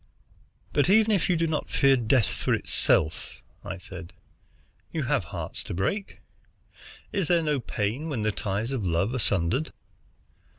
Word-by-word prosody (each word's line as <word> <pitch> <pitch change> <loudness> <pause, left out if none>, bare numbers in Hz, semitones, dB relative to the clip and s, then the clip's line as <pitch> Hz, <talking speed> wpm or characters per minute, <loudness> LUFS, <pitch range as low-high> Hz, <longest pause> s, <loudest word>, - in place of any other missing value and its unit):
"But 145 +4 +3
even 220 +2 +5
if 195 -4 +2
you 180 - +4
do 165 0 +1
not 155 -2 -2
fear 135 -1 +4
death 120 -1 +3
for - - 0
itself," 80 +1 +1 0.2
I 90 - -5
said, 90 -1 -10 0.8
"you - - -2
have - - +1
hearts - - -6
to - - -5
break. 190 - -2 0.9
Is 195 -5 0
there 170 -2 +3
no 150 -3 +1
pain 120 +7 -2
when 125 -8 -2
the 110 - +2
ties 105 +3 -2
of 130 -6 -2
love 90 +6 +1
are 130 - -1
sundered?" 105 - 0
125 Hz, 160 wpm, -27 LUFS, 100-160 Hz, 0.9 s, even